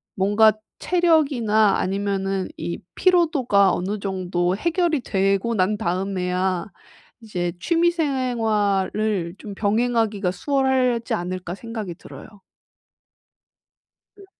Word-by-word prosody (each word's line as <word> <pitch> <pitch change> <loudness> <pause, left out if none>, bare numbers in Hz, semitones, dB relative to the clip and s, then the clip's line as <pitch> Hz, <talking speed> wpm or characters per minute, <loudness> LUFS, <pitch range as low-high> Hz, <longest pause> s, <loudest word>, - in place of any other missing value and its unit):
뭔가 205 +3 +4 0.3
체력이나 275 - +2
아니면은 195 0 -1
이 170 +1 -4 0.2
피로도가 300 - +3
어느 195 +3 -2
정도 185 -2 -1
해결이 335 - 0
되고 195 +1 0
난 200 +2 +1
다음에야 185 -1 -1 0.6
이제 180 -6 -3
'취미생활을 220 - 0
좀 205 -2 -9
병행하기가 215 -2 0
수월하지 255 +1 0
않을까.' 180 0 -4
생각이 220 -5 -6
들어요. - - -12 1.9
음. 400 - -14
205 Hz, 235 characters per minute, -22 LUFS, 190-245 Hz, 1.9 s, 뭔가